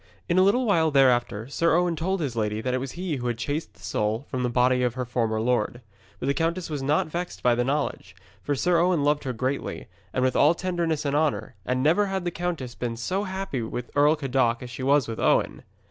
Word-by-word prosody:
In 175 +2 +3
a - - +6
little 215 +7 +3
while 165 -7 +3
thereafter 120 -5 +2
Sir 165 +4 +2
Owen 175 -1 +2
told 185 +3 -1
his 135 -6 -2
lady 105 -1 -1
that 125 +3 -2
it 130 - +1
was 130 0 -5
he 175 -4 -3
who 125 -1 -3
had 120 -2 -1
chased 145 -2 -3
the 95 - -22
soul 105 +6 -1
from 130 - -2
the 125 - 0
body 125 +1 +3
of 125 -1 0
her 130 -1 -2
former 115 -2 -1
lord. 120 0 0 0.4
But - - -4
the 140 - +2
countess 165 +3 -1
was 145 -2 -3
not 145 +3 +2
vexed 175 +3 -5
by 125 - +4
the 120 +1 +1
knowledge, 135 -9 -2 0.3
for 145 - -1
Sir 175 +5 +2
Owen 175 -3 +2
loved 145 0 +1
her 130 - -1
greatly, 130 +4 -3 0.2
and 130 - 0
with 130 -1 +1
all 150 +4 +5
tenderness 170 -4 -1
and 140 0 0
honour, 130 -7 0
and 130 0 0
never 175 +8 +3
had 190 -2 -3
the 175 - -1
countess 165 -8 -3
been 120 -1 -4
so 185 - -2
happy 190 -9 -3
with 115 +2 -5
Earl 145 +2 +5
Cadoc 130 -5 0
as 125 - -8
she 125 - -7
was 140 0 +3
with 115 -1 -5
Owen. - - +2
135 Hz, 240 wpm, -25 LUFS, 120-165 Hz, 0.4 s, a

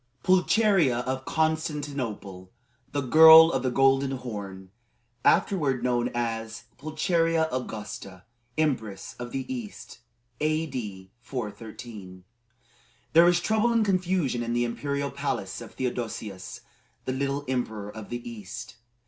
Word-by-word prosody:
PULCHERIA 185 - +3
of 130 +1 -3
CONSTANTINOPLE: 145 - -2 0.4
THE 145 - -1
GIRL 160 +4 +9
OF 135 - 0
THE 130 - 0
GOLDEN 135 +1 +3
HORN 100 -7 -7 0.5
(Afterward 145 -10 +2
known 125 -1 +1
as 115 -2 -3 0.2
"Pulcheria 160 +2 +1
Augusta, 105 -6 -6 0.3
Empress 120 -11 -1
of 120 0 -6
the 135 -1 -3
East.") 235 -5 -8 0.4
A.D. 130 -12 -2
413. 110 -5 -8 0.9
There 165 +2 +8
was 175 0 +4
trouble 220 +5 +2
and 230 -2 +3
confusion 185 -9 0
in 120 0 -2
the 120 0 +1
imperial 140 +4 -2
palace 140 -8 -3
of 115 - -11
Theodosius 110 -6 -4 0.4
the 130 - -1
Little, 140 +2 -2
Emperor 110 -5 -3
of 110 -1 -9
the 120 0 -5
East. 110 +1 -8
130 Hz, 115 wpm, -27 LUFS, 110-155 Hz, 0.9 s, GIRL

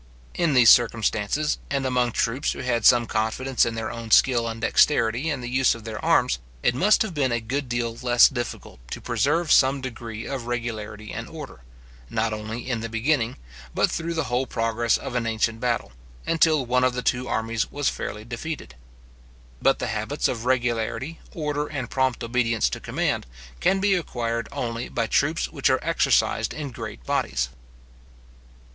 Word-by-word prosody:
In 165 -5 +1
these 120 -3 +8
circumstances, 115 +4 +2
and 140 -1 -1
among 125 -2 +1
troops 125 +5 0
who - - -7
had 120 -3 0
some 120 -1 +6
confidence 115 +4 0
in 115 - -3
their 110 -1 -3
own 115 -1 -7
skill 120 0 +4
and 115 0 -5
dexterity 115 +3 +2
in 145 -4 -2
the 120 - -5
use 130 0 +3
of 115 - -11
their 110 -1 -6
arms, - - +3 0.2
it 120 - +3
must 200 - +4
have 205 -5 -5
been 140 -5 +1
a 120 - +1
good 130 +4 -3
deal 120 -1 -1
less 120 -1 +6
difficult 120 - -6
to - - -5
preserve 145 +8 0
some 135 +1 +5
degree 115 -3 -6
of 130 -4 -5
regularity 110 -3 -4
and - - -6
order, - - -9 0.5
not 110 0 0
only 110 +2 -5
in 125 -3 -1
the 115 +1 -5
beginning, 120 +1 0 0.4
but - - +2
through 165 +1 -3
the 160 - 0
whole 125 +2 -1
progress 115 0 +1
of - - -7
an 120 -2 -1
ancient 115 0 0
battle, 120 - -1 0.3
and 165 - -1
till 155 -5 +4
one 125 +1 +2
of 130 -1 +3
the 125 0 -3
two 125 0 0
armies 115 -1 -1
was 145 -1 -1
fairly 105 +1 -3
defeated. 120 - -6 0.9
But - - +4
the - - -3
habits - - -1
of 115 -1 -4
regularity, 120 +3 -1
order, 150 -2 -2
and 130 -6 -5
prompt 130 -3 0
obedience 115 - +1
to - - -4
command, - - -2 0.3
can 195 - +2
be 200 0 +3
acquired 115 - -2
only 115 -1 -4
by - - -1
troops - - +1
which - - +1
are - - +4
exercised - - +1
in 145 -3 -5
great - - -8
bodies. 65 -1 0
120 Hz, 180 wpm, -24 LUFS, 115-135 Hz, 0.9 s, these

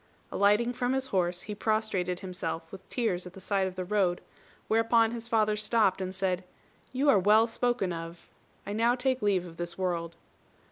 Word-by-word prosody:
Alighting 210 +4 +3
from 245 +1 -1
his 265 0 0
horse, 180 -1 +1
he 210 - -5
prostrated 205 -4 -1
himself 180 -3 -5
with 195 -1 -11
tears 185 -8 -1
at 180 - -11
the 195 - -11
side 195 0 0
of 185 - -7
the 185 -1 -4
road; 190 -3 +1 0.5
whereupon 225 0 +3
his 230 -1 -6
father 215 -2 +2
stopped 210 -3 +2
and 185 0 -4
said, 185 -1 -1 0.5
"You 265 +3 0
are 215 -8 +6
well 210 +4 +5
spoken 235 -5 -1
of. 165 +1 -8 0.4
I 205 - -4
now 230 +3 +3
take 260 0 0
leave 195 -4 +2
of 165 -1 -11
this 175 0 -5
world." 170 -3 -2
200 Hz, 185 wpm, -29 LUFS, 180-230 Hz, 0.5 s, are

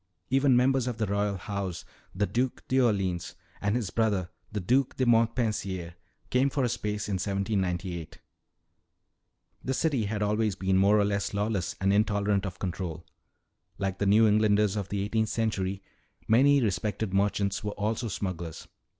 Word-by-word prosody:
Even 135 -1 +4
members 130 0 +2
of 120 -3 -3
the 110 - 0
royal 100 0 0
house, 95 -2 -4 0.3
the 105 +2 +1
Duc 125 +4 -1
d'Orleans 100 -9 +1 0.3
and 100 +2 +1
his 115 -7 -2
brother, 105 -6 0 0.2
the 105 - -2
Duc 125 +8 +1
de 130 - +2
Montpensier, 110 -7 +1 0.4
came 130 +2 +3
for 135 0 -1
a 120 - +1
space 105 -1 -3
in 100 -2 -1
1798. 95 -4 -2 1.5
"The 130 - -1
city 140 -9 +1
had 105 0 -2
always 105 -1 +1
been 95 0 0
more 100 +2 +5
or 105 - +3
less 100 0 -1
lawless 105 -4 -1
and 95 +1 +2
intolerant 100 -1 +1
of 90 -1 -7
control. 90 -3 -4 0.7
Like 95 -1 -2
the 100 - +1
New 110 +3 +6
Englanders 105 -1 +3
of 100 -2 -3
the 100 -1 -1
eighteenth 110 +1 0
century, 100 -4 -1 0.4
many 135 +4 +5
respected 100 0 -1
merchants 100 0 +1
were 105 0 -3
also 110 +3 -2
smugglers." 90 -5 -5
105 Hz, 155 wpm, -28 LUFS, 95-115 Hz, 1.5 s, New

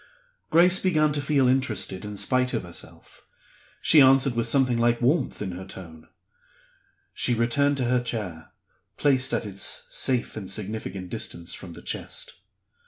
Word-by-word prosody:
Grace 175 +3 +5
began 155 -5 +2
to 145 - -1
feel 140 -2 +2
interested 110 -8 0
in 105 -1 -7
spite 130 +3 +1
of - - -2
herself. 85 -1 -8 0.6
She 155 - +7
answered 135 0 +5
with 115 0 0
something 125 -1 +2
like 120 0 +2
warmth 130 -2 +1
in 95 - -4
her 90 +2 -7
tone. 85 -4 -10 1.1
She 120 - +1
returned 140 +5 +2
to 130 - 0
her 125 +1 +2
chair 100 -9 -4 0.5
placed 130 -3 +2
at - - -1
its 100 -1 -3
safe 125 -2 0
and 100 -4 -6
significant 100 -3 -4
distance 85 0 -5
from 90 -3 -9
the - - -12
chest. - - -5
120 Hz, 155 wpm, -25 LUFS, 95-135 Hz, 1.1 s, She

